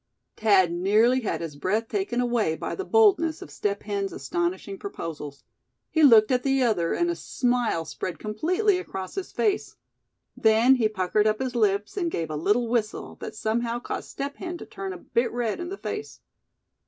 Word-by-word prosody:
Thad 195 -5 +4
nearly 210 +8 +3
had 220 - -2
his 160 -3 -5
breath 210 +9 -1
taken 385 - -2
away 240 -9 +1
by - - -4
the 390 - -3
boldness 380 -7 +3
of - - -13
Step 200 -1 -2
Hen's 200 -2 -2
astonishing 175 +7 -3
proposals. 150 -7 -7 0.5
He 320 - +2
looked 230 -5 +7
at 250 -1 +3
the 270 -1 +2
other, 190 -8 +1
and 345 0 +1
a - - -3
smile 245 - 0
spread 180 +3 -5
completely 360 - +1
across 190 - -6
his 390 - -5
face. 415 -3 0 0.6
Then 225 +4 +5
he 220 -3 +2
puckered 210 +1 +1
up 215 0 +2
his 260 -2 -2
lips, 205 - +1
and 345 -3 0
gave 165 - -3
a - - -3
little 210 +10 +1
whistle, 225 -2 -2
that - - -6
somehow 230 +2 -1
caused 240 - -5
Step 280 +1 -5
Hen 350 -1 -5
to - - -9
turn 195 -1 -6
a 185 - -6
bit 235 +7 -1
red 235 -3 -2
in 350 0 -4
the 395 - -5
face. 430 +1 -6
225 Hz, 185 wpm, -26 LUFS, 195-270 Hz, 0.6 s, looked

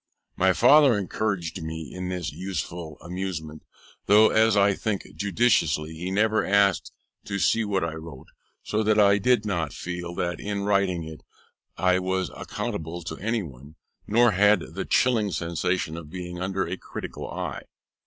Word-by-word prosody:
My 95 0 +3
father 135 +3 +6
encouraged 95 -3 -2
me 80 -3 -6
in 90 0 -5
this 90 -1 -3
useful 85 -3 -5
amusement, 85 -4 -5 0.5
though, 105 +2 +7
as 110 -1 +3
I 100 0 +4
think 100 0 -2
judiciously, 90 - +1
he 85 +3 -5
never 110 +3 +2
asked 100 -3 +2 0.3
to 100 - -3
see 115 +3 +2
what 100 -4 -1
I 85 -1 -2
wrote; 80 -4 -9 0.4
so 105 - -1
that 110 0 +2
I 100 0 +5
did 120 0 +2
not 85 -8 -2
feel 85 -1 -5
that 85 -1 -2
in 100 -1 -3
writing 100 -4 +1
it 80 -1 -9 0.6
I 90 0 +3
was 95 0 -1
accountable 85 +2 -5
to 80 -1 -6
any 115 +1 -1
one, 70 0 -12 0.3
nor 120 +2 +4
had 105 +2 +3
the - - -4
chilling 115 -5 +2
sensation 85 -1 -1
of 80 -3 -9
being 90 0 -7
under 95 +1 -1
a 90 +3 -4
critical - - -7
eye. - - -5
95 Hz, 160 wpm, -25 LUFS, 85-105 Hz, 0.6 s, though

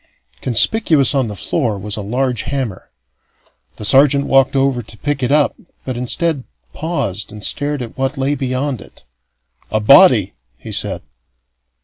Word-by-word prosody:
Conspicuous 140 - +3
on 135 -4 +1
the 105 - -6
floor 110 - -2
was 105 +1 -5
a 105 - -5
large 125 +3 -1
hammer. 130 -9 -4 0.9
The 105 - -6
sergeant 140 +4 +4
walked 135 0 +3
over 135 -2 +1
to 110 -1 -14
pick 145 +4 -2
it 125 +1 0
up, 145 -1 +2 0.3
but, 130 - -4
instead, 140 +4 -1 0.3
paused 150 - -3
and 105 -1 -10
stared 145 +4 -1
at 115 - -10
what 135 +1 -2
lay 135 +2 0
beyond 130 -2 -2
it. - - -16 0.7
"A 110 - 0
body!" 120 - +6 0.2
he - - -10
said. - - -1
130 Hz, 150 wpm, -17 LUFS, 115-140 Hz, 0.9 s, body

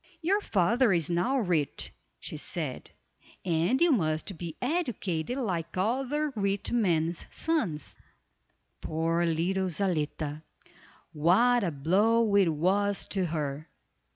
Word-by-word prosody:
"Your 395 +5 +2
father 230 - +2
is 170 -2 +1
now 205 +11 +1
rich," 175 - 0 0.3
she - - -5
said, - - -4 0.6
"and 175 +8 +1
you 340 -1 +4
must 160 - 0
be 165 -1 -6
educated 245 - -2
like 180 -10 -3
other 270 +8 0
rich 200 -1 -1
men's 170 -7 +1
sons." 215 - -1 0.9
Poor 165 +2 0
little 185 +4 0
Zaletta! 155 -4 -1 0.7
What 215 +10 +4
a 180 - +1
blow 200 +9 +2
it 195 -4 +5
was 195 +6 +1
to 190 -3 0
her. 150 -2 -4
185 Hz, 115 wpm, -28 LUFS, 165-230 Hz, 0.9 s, it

